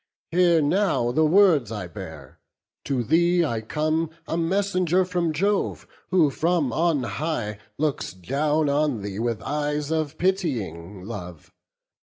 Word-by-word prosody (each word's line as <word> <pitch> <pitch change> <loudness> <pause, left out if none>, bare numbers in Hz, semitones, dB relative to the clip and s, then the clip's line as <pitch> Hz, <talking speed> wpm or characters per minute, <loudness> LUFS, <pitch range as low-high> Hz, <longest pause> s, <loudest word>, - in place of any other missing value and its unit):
Hear 170 -2 +4
now 155 -7 +1
the 155 +5 +3
words 165 - +4
I 105 -4 -4
bear: 80 -7 -10 0.5
to 130 -3 0
thee 170 +5 +3
I 115 -6 -2
come 155 +7 -1 0.2
A - - -2
messenger 185 +1 +1
from 175 -3 0
Jove, 195 +6 0 0.2
who 170 -6 +4
from 160 -5 0
on 160 -3 +1
high 120 -7 -3 0.2
Looks 150 -1 -1
down 145 - 0
on 140 -6 +1
thee 100 0 -5
with 115 -2 -2
eyes 150 +1 -2
of 155 -2 -1
pitying 110 - -2
love. 90 -6 -8
150 Hz, 135 wpm, -24 LUFS, 115-170 Hz, 0.5 s, Hear